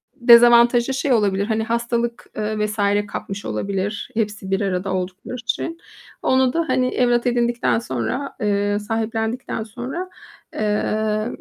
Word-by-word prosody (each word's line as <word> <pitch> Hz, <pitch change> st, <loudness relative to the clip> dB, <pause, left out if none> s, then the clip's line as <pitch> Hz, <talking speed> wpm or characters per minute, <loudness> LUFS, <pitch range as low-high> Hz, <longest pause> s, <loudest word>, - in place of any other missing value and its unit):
dezavantajı 240 Hz, 0 st, +6 dB
şey 270 Hz, 0 st, +1 dB
olabilir: 200 Hz, -3 st, +2 dB
Hani, 220 Hz, 0 st, 0 dB
hastalık, 235 Hz, +1 st, -2 dB
eee, 215 Hz, 0 st, -1 dB
vs. 210 Hz, +1 st, -5 dB, 0.3 s
kapmış 195 Hz, +1 st, -6 dB
olabilir 200 Hz, +1 st, -3 dB
hepsi 210 Hz, -3 st, -3 dB
bir 195 Hz, -, +1 dB
arada 190 Hz, -1 st, -1 dB
oldukları 185 Hz, +6 st, -4 dB
için. 260 Hz, +7 st, -3 dB, 0.4 s
Onu 260 Hz, -1 st, +2 dB
da, 335 Hz, -, +1 dB
hani, 255 Hz, 0 st, +2 dB
evlat 240 Hz, -1 st, +1 dB
edindikten 240 Hz, -1 st, +1 dB
sonra, 235 Hz, -, -3 dB
eee, 205 Hz, 0 st, +1 dB
sahiplendikten 225 Hz, +2 st, -2 dB
sonra, 250 Hz, -, -6 dB, 0.4 s
eee, 215 Hz, 0 st, 0 dB
225 Hz, 125 wpm, -21 LUFS, 205-240 Hz, 0.4 s, dezavantajı